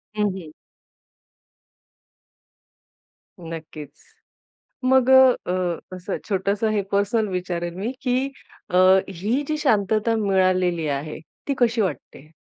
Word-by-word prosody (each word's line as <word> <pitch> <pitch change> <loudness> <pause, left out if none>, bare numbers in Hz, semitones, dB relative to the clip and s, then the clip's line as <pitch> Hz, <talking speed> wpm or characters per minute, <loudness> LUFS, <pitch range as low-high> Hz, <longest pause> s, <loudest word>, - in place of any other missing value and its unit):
हं, 210 -1 +1
हं. 160 -4 -10 2.9
नक्कीच. 155 -3 -9 0.8
मग 260 0 +4
अ, 260 -1 +7
अ, 180 -2 -1 0.2
असं 185 +2 -4
छोटसं 200 +2 0
हे 210 -2 0
पर्सनल 205 +2 +1
विचारेल 175 -2 -3
मी 210 +7 -3
की 250 -1 +1 0.5
अ, 180 - 0 0.3
ही 205 +9 -1
जी 305 - 0
शांतता 220 -4 +1
मिळालेली 185 -5 +1
आहे, 145 +2 -3 0.3
ती 280 - +1
कशी 235 -1 +2
वाटते? 155 -4 -4
195 Hz, 105 wpm, -23 LUFS, 175-225 Hz, 2.9 s, अ